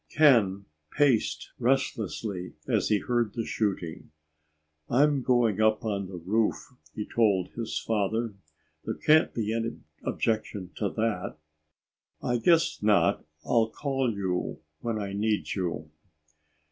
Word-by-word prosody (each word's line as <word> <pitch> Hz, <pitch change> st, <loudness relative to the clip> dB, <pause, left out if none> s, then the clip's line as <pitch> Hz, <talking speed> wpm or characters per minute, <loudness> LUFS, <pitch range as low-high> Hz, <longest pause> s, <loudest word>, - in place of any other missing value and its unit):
Ken 110 Hz, -10 st, +4 dB, 0.2 s
paced 135 Hz, -, +1 dB
restlessly 110 Hz, -7 st, -1 dB
as -, -, +1 dB
he 105 Hz, -, +3 dB
heard 120 Hz, -1 st, 0 dB
the 115 Hz, -, -2 dB
shooting. 95 Hz, -7 st, -2 dB, 0.8 s
"I'm 145 Hz, +2 st, +3 dB
going 120 Hz, -5 st, +2 dB
up 110 Hz, +2 st, +3 dB
on 100 Hz, -3 st, -1 dB
the 90 Hz, -1 st, -7 dB
roof," 105 Hz, +8 st, -1 dB, 0.2 s
he 105 Hz, -, -3 dB
told 100 Hz, -6 st, +2 dB
his 115 Hz, -1 st, -4 dB
father. 110 Hz, +1 st, -1 dB, 0.5 s
"There -, -, -3 dB
can't 155 Hz, +1 st, +4 dB
be 110 Hz, -1 st, -2 dB
any 115 Hz, 0 st, -2 dB, 0.2 s
objection 105 Hz, -4 st, -2 dB
to 105 Hz, -, 0 dB
that." 110 Hz, -7 st, -2 dB, 0.8 s
"I 120 Hz, -1 st, 0 dB
guess 165 Hz, +6 st, +3 dB
not. 105 Hz, -1 st, +3 dB, 0.2 s
I'll 115 Hz, -2 st, +3 dB
call 135 Hz, -1 st, -1 dB
you 95 Hz, -2 st, -2 dB, 0.2 s
when 115 Hz, +3 st, -2 dB
we 100 Hz, -2 st, -4 dB
need 105 Hz, +1 st, 0 dB
you." 85 Hz, -5 st, -3 dB
110 Hz, 125 wpm, -28 LUFS, 100-120 Hz, 0.8 s, Ken